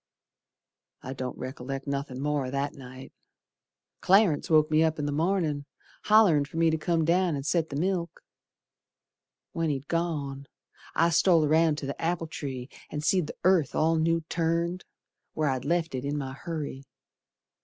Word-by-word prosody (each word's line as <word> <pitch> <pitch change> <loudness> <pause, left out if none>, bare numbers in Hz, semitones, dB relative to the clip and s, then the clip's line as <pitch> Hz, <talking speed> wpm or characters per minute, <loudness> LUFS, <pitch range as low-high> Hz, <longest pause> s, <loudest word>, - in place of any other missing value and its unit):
I 130 - -5
don't 130 -1 -5
rec'lect 135 +1 -6
nothin' 140 -2 -4
more 145 -3 0
o' - - -4
that 140 +2 -2
night. 130 -1 -11 0.9
Clarence 190 -5 +3
woke 155 -1 +4
me 155 +1 +4
up 160 -1 +2
in 150 - -2
th' 145 - -1
mornin', 155 -3 0 0.4
Hollerin' 210 -9 +5
fer 150 - -9
me 165 -1 +3
to 160 - 0
come 165 0 +1
down 175 0 +2
and 140 -1 -5
set 160 0 +1
th' 140 - -6
milk. 175 +1 -2 1.3
When 165 -1 -1
he'd 140 -1 -3
gone, 145 -5 -2 0.5
I 165 +1 +3
stole 170 -2 +4
roun' 160 0 +3
to 150 - -6
the 140 - -5
apple 165 0 -1
tree 135 -5 -6 0.2
And 150 0 -5
seed 180 0 +2
the - - -7
earth 180 -6 +3
all 160 +1 +3
new 165 +1 +2
turned 170 +2 -1 0.5
Where 155 -2 +1
I 130 - -1
left 165 +3 -1
it 130 -1 -3
in 145 +1 -2
my 135 -2 -4
hurry. 150 -3 -5
155 Hz, 165 wpm, -27 LUFS, 140-170 Hz, 1.3 s, Hollerin